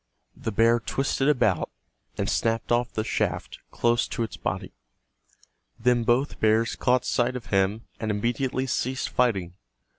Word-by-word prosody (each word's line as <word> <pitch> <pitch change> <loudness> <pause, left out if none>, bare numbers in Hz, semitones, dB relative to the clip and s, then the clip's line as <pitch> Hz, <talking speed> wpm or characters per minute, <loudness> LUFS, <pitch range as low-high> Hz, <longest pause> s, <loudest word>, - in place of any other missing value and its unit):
The 115 - -4
bear 115 +3 +4
twisted 135 +4 0
about 110 - +2 0.5
and - - -1
snapped 115 0 0
off 120 0 +2
the 110 - -2
shaft - - -2
close 120 0 +1
to 120 - -2
its 105 -5 -5
body. - - -4 1.1
Then 120 0 +3
both 125 +4 +1
bears 110 +2 +2
caught 125 0 +2
sight 125 0 +1
of 125 - -6
him, 100 +3 +1
and 110 - -2
immediately 120 +5 0
ceased 130 +1 -1
fighting. 100 -9 +1
120 Hz, 145 wpm, -26 LUFS, 110-125 Hz, 1.1 s, bear